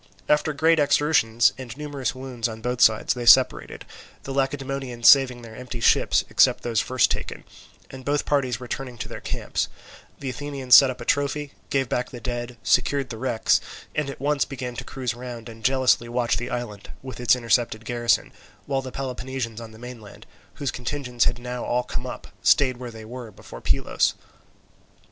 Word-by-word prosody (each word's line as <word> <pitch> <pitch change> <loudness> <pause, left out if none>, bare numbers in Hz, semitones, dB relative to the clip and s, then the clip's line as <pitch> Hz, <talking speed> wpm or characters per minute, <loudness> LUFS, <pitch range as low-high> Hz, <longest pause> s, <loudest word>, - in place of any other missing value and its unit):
After 150 +1 +2
great 160 +2 +3
exertions 140 -6 +3
and 125 -1 -8
numerous 145 -4 -3
wounds 130 -3 -4
on 110 0 -7
both 125 0 -2
sides 110 -1 +4
they 120 -1 -5
separated, 130 +1 +5 0.4
the 135 - -5
Lacedaemonians 135 -3 -1
saving 130 -3 +6
their 110 -1 -11
empty 125 0 -7
ships, - - +3
except - - +3
those 115 -2 0
first 130 -2 +2
taken; - - -4 0.5
and 130 0 -9
both 145 +2 0
parties 130 -5 0
returning 125 0 -6
to 120 - -5
their - - -8
camp, - - -4 0.6
the 135 - -5
Athenians 140 -2 -2
set 135 0 +10
up 130 0 -6
a - - -6
trophy, 145 0 0 0.2
gave 135 -2 +1
back 125 +1 -2
the 120 - -9
dead, 120 +1 -5
secured 135 +1 +2
the 110 - -7
wrecks, 125 -3 +2 0.3
and 150 -2 -1
at 140 - -7
once 145 0 +1
began 125 -3 -6
to - - -4
cruise 130 -4 -4
round 120 -1 -8
and 115 -1 -11
jealously 130 -2 +3
watch 120 0 +1
the 120 +1 -4
island, 120 -5 -5
with 130 -2 -8
its 120 -2 +4
intercepted 115 -2 0
garrison, 120 -1 +1 0.3
while 135 -1 -1
the 130 -1 -7
Peloponnesians 125 -3 -4
on 115 - -8
the 110 - -14
mainland, 120 -3 -11 0.3
whose 140 -3 -2
contingents 125 -1 -2
had 120 - +1
now 125 0 -5
all 125 +1 0
come - - -5
up, - - -7 0.2
stayed 130 -3 +4
where 125 -1 -7
they 110 -1 -10
were 120 0 -8
before - - -12
Pylos. - - +1
125 Hz, 180 wpm, -24 LUFS, 120-135 Hz, 0.6 s, set